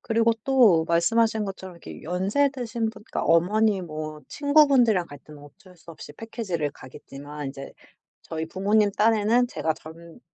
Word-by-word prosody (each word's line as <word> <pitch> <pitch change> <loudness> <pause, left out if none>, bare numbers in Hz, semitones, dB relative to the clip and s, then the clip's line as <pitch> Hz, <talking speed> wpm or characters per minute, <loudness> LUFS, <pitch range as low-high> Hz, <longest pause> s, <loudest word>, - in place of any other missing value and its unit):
그리고 230 0 +2
또 230 -12 +4
말씀하신 220 +6 +2
것처럼 190 -2 -8
이렇게 170 - -11
연세 190 - +1
드신 235 -4 -3
분 220 - -15
그러니까 - - -2
어머니 200 +5 +2
뭐 155 -2 -7
친구 295 +1 +4
분들이랑 230 -10 +3
갈 145 - -12
때는 150 +1 -15
어쩔 180 +6 -17
수 170 - -14
없이 155 -2 -11
패키지를 185 -6 -4
가겠지만 145 +2 -10
인제 135 0 -8 0.5
저희 160 0 -5
부모님 205 +4 +1
딴에는 225 +3 +2
제가 160 -8 -2
젊 165 +5 -14
190 Hz, 360 characters per minute, -25 LUFS, 160-225 Hz, 0.5 s, 또